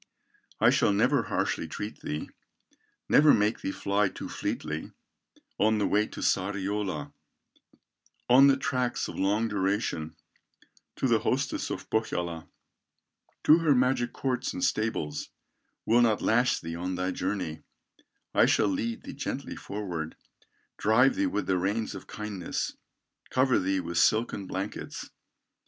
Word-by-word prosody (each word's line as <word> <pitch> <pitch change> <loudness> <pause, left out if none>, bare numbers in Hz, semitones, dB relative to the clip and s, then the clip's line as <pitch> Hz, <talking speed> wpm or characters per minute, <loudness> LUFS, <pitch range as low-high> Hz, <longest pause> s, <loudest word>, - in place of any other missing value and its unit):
I - - +6
shall - - +3
never 100 - +3
harshly 80 - -1
treat 105 +7 -6
thee, 75 +1 -4 0.8
Never 150 0 +6
make 105 +1 +1
thee - - -2
fly 100 +1 +1
too - - -8
fleetly, 75 +1 -4 0.7
On 110 +1 +3
the 105 - +1
way 105 +1 +2
to - - -8
Sariola, 100 +1 -1 1.1
On 130 +3 +7
the 135 -1 +5
tracks 130 -3 -1
of - - -7
long 105 +4 +2
duration, 95 -6 -1 0.8
To - - 0
the - - +3
hostess - - -1
of - - -5
Pohyola, 85 -7 -2 1.0
To 155 +2 +7
her 155 -4 +3
magic 125 -1 +2
courts 130 -2 -2
and 90 - -4
stables, 90 -6 -1 0.6
Will 120 +2 +4
not 110 -3 +3
lash 120 +3 +2
thee 85 0 -6
on 90 +2 -3
thy 90 +1 -1
journey; 90 -4 -3 0.7
I - - +5
shall 105 - +3
lead 115 +4 -2
thee - - -7
gently - - -4
forward, 90 -6 -5 0.6
Drive 115 +6 +4
thee 290 +1 +1
with 275 - -2
the 95 -1 +1
reins 105 +5 -1
of - - -9
kindness, 105 -5 -4 0.5
Cover 130 0 +3
thee 95 +1 0
with 85 -1 -2
silken 110 -3 +2
blankets." 95 +2 -5
105 Hz, 140 wpm, -28 LUFS, 95-115 Hz, 1.1 s, On